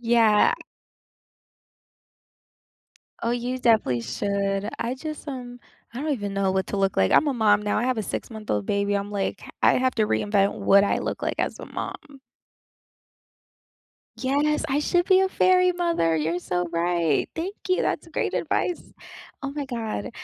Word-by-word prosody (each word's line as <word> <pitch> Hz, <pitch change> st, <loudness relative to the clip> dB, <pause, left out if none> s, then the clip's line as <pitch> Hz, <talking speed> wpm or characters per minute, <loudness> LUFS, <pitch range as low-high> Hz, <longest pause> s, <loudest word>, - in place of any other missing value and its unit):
Yeah. 230 Hz, -3 st, +4 dB, 2.7 s
Oh, 230 Hz, -, +1 dB
you 245 Hz, +1 st, -2 dB
definitely 220 Hz, -, +2 dB
should. 200 Hz, -, -1 dB
I 235 Hz, +2 st, -2 dB
just, 305 Hz, +3 st, -7 dB
um 245 Hz, -3 st, -7 dB, 0.3 s
I 245 Hz, -, -5 dB
don't 305 Hz, +1 st, -1 dB
even 205 Hz, -7 st, -3 dB
know 195 Hz, -1 st, +1 dB
what 190 Hz, 0 st, -1 dB
to 200 Hz, -, -3 dB
look 195 Hz, -1 st, +1 dB
like. 95 Hz, 0 st, +3 dB
I'm 305 Hz, -, +5 dB
a 285 Hz, -, +1 dB
mom 210 Hz, -3 st, +3 dB
now. 210 Hz, 0 st, 0 dB
I 215 Hz, -, 0 dB
have 255 Hz, -1 st, 0 dB
a 220 Hz, -, -1 dB
six-month-old 210 Hz, -, -4 dB
baby, 200 Hz, -, 0 dB
I'm, 200 Hz, 0 st, -1 dB
like, 200 Hz, -2 st, -3 dB, 0.2 s
I -, -, +6 dB
have 255 Hz, 0 st, +1 dB
to 220 Hz, -, +2 dB
reinvent 205 Hz, -1 st, +1 dB
what 200 Hz, 0 st, +5 dB
I 205 Hz, -, +1 dB
look -, -, -4 dB
like -, -, -1 dB
as -, -, -1 dB
a -, -, -7 dB
mom. 285 Hz, -4 st, -7 dB, 2.0 s
Yes, 290 Hz, +3 st, +1 dB
I 275 Hz, +1 st, +1 dB
should 350 Hz, +3 st, +1 dB
be 375 Hz, -1 st, +5 dB
a 380 Hz, 0 st, +2 dB
fairy 365 Hz, -1 st, +4 dB
mother, 335 Hz, -, +1 dB
you're 160 Hz, +3 st, -1 dB
so 180 Hz, 0 st, -2 dB
right. 170 Hz, -3 st, +1 dB
Thank 350 Hz, +5 st, -3 dB, 0.2 s
you, 370 Hz, -, +2 dB
that's -, -, -2 dB
great -, -, -2 dB
advice. 355 Hz, -, -1 dB, 0.6 s
Oh, 275 Hz, -, -3 dB
my 285 Hz, 0 st, -4 dB
god. 230 Hz, -2 st, -4 dB
225 Hz, 165 wpm, -25 LUFS, 195-275 Hz, 2.7 s, I